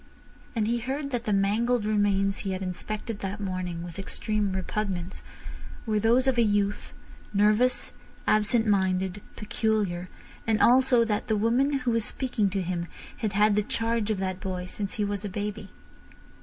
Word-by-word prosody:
And 215 -2 +1
he 235 +1 +1
heard 275 +4 -3
that 240 -2 -2
the 215 - 0
mangled 210 +4 +2
remains 200 -2 +1
he 195 -2 -3
had 185 +1 -4
inspected 210 +4 -4
that 195 +2 -4
morning 185 -4 -3
with 175 +1 -8
extreme 205 0 -1
repugnance 190 -2 -3 0.6
were 215 -2 +1
those 235 +4 +3
of 260 -3 +2
a - - +6
youth, 205 -2 0 0.4
nervous, 215 +5 +3 0.3
absent 215 +2 +3
minded, 190 -1 +1
peculiar, 210 -5 -1 0.4
and 220 -1 +2
also 250 -1 +5
that 210 0 -1
the 220 -2 +1
woman 240 +7 +2
who 240 - +2
was 230 -1 +2
speaking 235 -4 0
to 190 0 -2
him 175 -1 -3 0.3
had 220 -3 -2
had 210 +1 +4
the 210 - +3
charge 225 +1 -1
of 215 - +1
that 185 -1 -2
boy 185 -2 -4
since 200 +2 -5
he 210 - 0
was 205 0 -3
a 205 - -3
baby. 205 +2 -4
210 Hz, 170 wpm, -27 LUFS, 195-225 Hz, 0.6 s, a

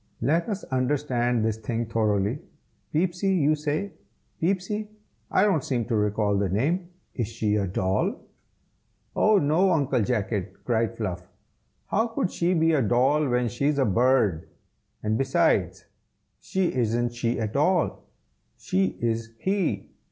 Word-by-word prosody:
"Let 160 - +1
us 205 -1 -3
understand 125 -3 0
this 110 -1 0
thing 115 +1 -3
thoroughly. 110 +1 0 0.5
Peepsy, 180 +4 +1
you 155 -3 +3
say? 155 +6 -2 0.5
Peepsy? 195 +4 -1 0.4
I 190 - +3
don't 190 -9 +2
seem 120 -4 -1
to 115 - -1
recall 105 -1 +1
the 100 -2 0
name. 160 - 0 0.2
Is 120 -5 -2
she 110 -2 -1
a 100 -2 0
doll?" 95 +1 0 1.0
"Oh! 215 -1 +4
no! 165 +4 +3
Uncle 145 -8 +2
Jacket!" 105 -3 -2
cried 115 -3 0
Fluff. 90 -1 -4 0.6
"How 225 +3 +1
could 225 -5 -2
she 175 +2 +1
be 165 0 +3
a 145 - +3
doll 130 +6 +2
when 125 0 +1
she 120 +5 -1
is 150 -1 +1
a 135 - +3
bird? 110 -6 +2 0.5
and 110 +1 0
besides, 135 0 +1 0.5
she 190 -2 -1
isn't 120 0 0
she 120 0 -1
at 110 0 -3
all; 165 +4 +1 0.5
she 95 0 -1
is 115 -1 -2
he." 185 - -1
125 Hz, 145 wpm, -26 LUFS, 110-160 Hz, 1.0 s, Oh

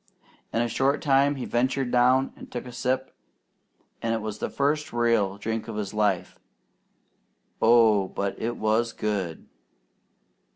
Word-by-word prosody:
In 115 - +1
a - - 0
short 135 +5 +1
time 140 0 +3
he 130 - -5
ventured 130 +1 0
down 125 +2 +3
and - - -12
took 125 - -5
a 125 - -8
sip, 130 +2 -2 0.9
and 115 0 0
it 110 - -3
was 105 0 -5
the - - -2
first 150 +2 0
real 115 -5 +1
drink 110 +2 -3
of 115 - -6
his 105 -2 -4
life. 100 -4 0 1.2
Oh, 110 -4 +5
but 100 +1 -3
it 120 +1 -2
was 110 +2 +1
good! 100 -6 -3
115 Hz, 150 wpm, -26 LUFS, 105-130 Hz, 1.2 s, Oh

